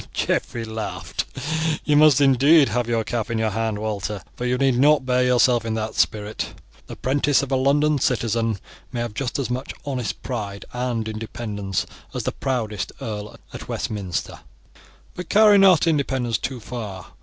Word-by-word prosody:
Geoffrey 115 -1 -1
laughed. 110 0 -4 0.6
"You 150 - +3
must 150 -2 +6
indeed 140 +2 +6
have 120 +2 -1
your 115 -1 +1
cap 120 0 -3
in 115 - -1
your 110 -1 0
hand, 110 0 -1
Walter; 105 -2 -3
but 125 - -4
you 125 0 +1
need 130 -2 +2
not 145 0 +4
bear 125 0 +2
yourself 125 -1 +3
in 115 -1 -2
that 110 0 -3
spirit. 105 0 -1 0.3
The - - -7
'prentice 140 +2 +2
of 140 - -5
a - - +3
London 145 +3 +3
citizen 115 -3 0 0.3
may 120 -2 -3
have 120 -2 -4
just 125 +3 -2
as 135 -3 -2
much 130 +2 -4
honest 130 -5 -3
pride 105 -6 -4
and 125 -3 -2
independence 105 -3 -3 0.3
as - - -2
the - - -1
proudest 115 -7 -2
earl 105 -1 -6 0.2
at - - -8
Westminster; 100 -5 -3 0.7
but 180 -2 -7
carry 210 -1 +6
not 190 -4 +6
independence 135 -7 0
too 130 -2 -4
far. 105 -5 -7
120 Hz, 165 wpm, -23 LUFS, 110-135 Hz, 0.7 s, must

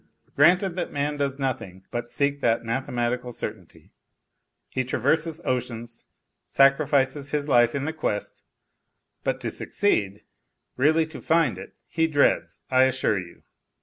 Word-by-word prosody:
Granted 175 +5 +4
that - - -2
man 145 +1 -2
does 140 -1 -1
nothing 95 -9 -4
but 120 0 -4
seek 140 0 0
that 115 -1 +1
mathematical 125 +1 -2
certainty, - - -8 0.8
he 130 - 0
traverses 155 +6 0
oceans, 120 -2 -4 0.4
sacrifices 135 0 +3
his 145 0 -2
life 120 -3 +4
in 140 0 -2
the 160 - -2
quest, 130 -10 -3 0.8
but - - -1
to - - -2
succeed, 105 - 0 0.5
really 155 +5 +3
to 160 0 -10
find 165 0 +2
it, - - -11
he 165 -1 +1
dreads, 145 -3 +1
I 130 0 +6
assure 130 -6 +1
you. 85 -1 -11
135 Hz, 135 wpm, -25 LUFS, 120-150 Hz, 0.8 s, I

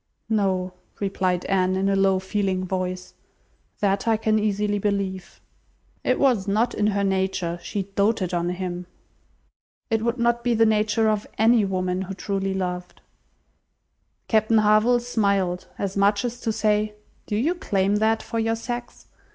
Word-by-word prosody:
"No," 190 -4 0 0.3
replied 185 -3 -1
Anne, 185 -1 +1
in 190 +1 0
a 195 - +2
low, 195 -1 +3
feeling 190 -1 -1
voice. 185 0 -3 0.7
"That 200 +1 +1
I 225 -1 +3
can 215 0 +1
easily 210 0 0
believe." 195 -2 -2 0.6
"It - - +1
was 240 -8 +2
not 220 +4 +1
in 210 - +1
her 200 -1 +1
nature. 190 -3 -1
She 200 +2 -3
doted 200 -1 0
on 175 0 0
him." 180 -1 -4 1.0
"It 225 -1 +2
would 235 +2 0
not 235 0 +1
be 240 -1 +2
the 225 0 +4
nature 215 0 +2
of 215 -1 0
any 225 0 +4
woman 185 -1 -1
who 190 0 -5
truly 195 0 -2
loved." 180 -1 -4 1.3
Captain 220 0 +3
Harville 215 +3 +4
smiled, 200 -6 0
as 195 -1 -3
much 200 +3 +2
as 240 0 -4
to 225 - 0
say, 210 0 0 0.3
"Do 210 - -2
you 275 +11 +1
claim 200 - 0
that 220 +1 +1
for 230 - -3
your 225 0 +1
sex?" 240 +1 -6
200 Hz, 155 wpm, -24 LUFS, 190-220 Hz, 1.3 s, the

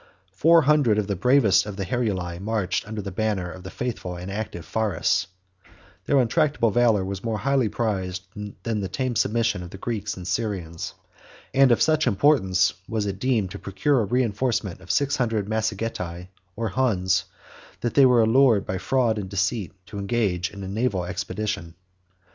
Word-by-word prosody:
Four 165 - +5
hundred 140 -7 +4
of 105 - +1
the 100 0 -2
bravest 110 -1 +4
of 105 - -5
the 100 - -2
Heruli 95 -6 -2
marched 100 -3 -1
under 110 -1 -5
the 100 - -5
banner 95 -3 -1
of 90 - -10
the 95 - -8
faithful 105 -6 -4
and 90 +2 -6
active 100 -5 -5
Pharas; 105 -3 0 0.8
their 145 - +2
untractable 130 -2 +2
valor 115 -4 +3
was 95 0 -5
more 115 -2 -1
highly 135 -2 +1
prized 95 -4 -2 0.4
than 115 -2 -1
the 95 - -2
tame 130 +4 -2
submission 115 -3 +1
of 90 - -8
the 95 - -9
Greeks 105 -2 -3
and 90 -1 -7
Syrians; 95 -8 -3 0.6
and 135 -1 +5
of 120 - +4
such 155 -1 +2
importance 95 -6 +3 0.2
was 110 -2 -1
it 100 -1 -4
deemed 115 -7 0
to - - -7
procure 115 +8 +1
a - - 0
reenforcement 115 -3 -1
of - - -15
six 140 0 +1
hundred 115 -5 0
Massagetae, 105 -5 -3 0.3
or 115 0 -2
Huns, 95 -6 +1 0.6
that 120 - -1
they 140 -2 +7
were 120 -2 +5
allured 115 -3 +4
by 95 - -3
fraud 115 +1 +1
and 95 -2 -5
deceit 95 +1 -1
to 100 0 -7
engage 100 -4 0
in 100 -1 -9
a - - -5
naval 100 -3 -1
expedition. 100 -3 -4
105 Hz, 175 wpm, -24 LUFS, 95-120 Hz, 0.8 s, they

